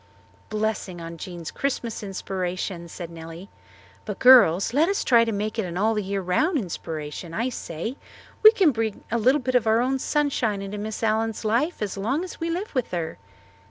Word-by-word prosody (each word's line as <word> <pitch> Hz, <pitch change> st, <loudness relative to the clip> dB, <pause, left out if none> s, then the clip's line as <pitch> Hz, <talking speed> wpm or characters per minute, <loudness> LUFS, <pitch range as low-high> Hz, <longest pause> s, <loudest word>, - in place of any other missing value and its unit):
"Blessing 215 Hz, -4 st, -2 dB
on 165 Hz, 0 st, -7 dB
Jean's 170 Hz, -1 st, -7 dB
Christmas 245 Hz, -5 st, -3 dB
inspiration," 185 Hz, -3 st, -4 dB
said 170 Hz, 0 st, -8 dB
Nellie. 165 Hz, +3 st, -9 dB, 0.5 s
"But, -, -, -5 dB
girls, 235 Hz, -7 st, +6 dB
let 310 Hz, +6 st, +3 dB
us 400 Hz, -, 0 dB
try 235 Hz, -2 st, +5 dB
to 225 Hz, -, -1 dB
make 215 Hz, +2 st, -2 dB
it 215 Hz, -, 0 dB
an 175 Hz, 0 st, -5 dB
all 215 Hz, +3 st, +2 dB
the 210 Hz, -, 0 dB
year 195 Hz, 0 st, -2 dB
round 180 Hz, -, +1 dB
inspiration, 165 Hz, -, -5 dB
I 235 Hz, +3 st, 0 dB
say. 225 Hz, -, -5 dB, 0.4 s
We 435 Hz, -, +10 dB
can 385 Hz, -8 st, +4 dB
bring 225 Hz, -3 st, -3 dB
a 235 Hz, -, +1 dB
little 260 Hz, +5 st, +3 dB
of 240 Hz, -3 st, +3 dB
our 220 Hz, +1 st, +4 dB
own 260 Hz, +2 st, +1 dB
sunshine 255 Hz, -9 st, 0 dB
into 200 Hz, +1 st, -5 dB
Miss 215 Hz, +2 st, -5 dB
Allen's 220 Hz, 0 st, 0 dB
life 235 Hz, +6 st, +1 dB
as 200 Hz, -1 st, -4 dB
long 260 Hz, -, -1 dB
as 370 Hz, -, -8 dB
we 330 Hz, 0 st, -2 dB
live 360 Hz, +5 st, -3 dB
with 255 Hz, -4 st, -1 dB
her." 170 Hz, -, -4 dB
215 Hz, 190 wpm, -25 LUFS, 180-255 Hz, 0.5 s, We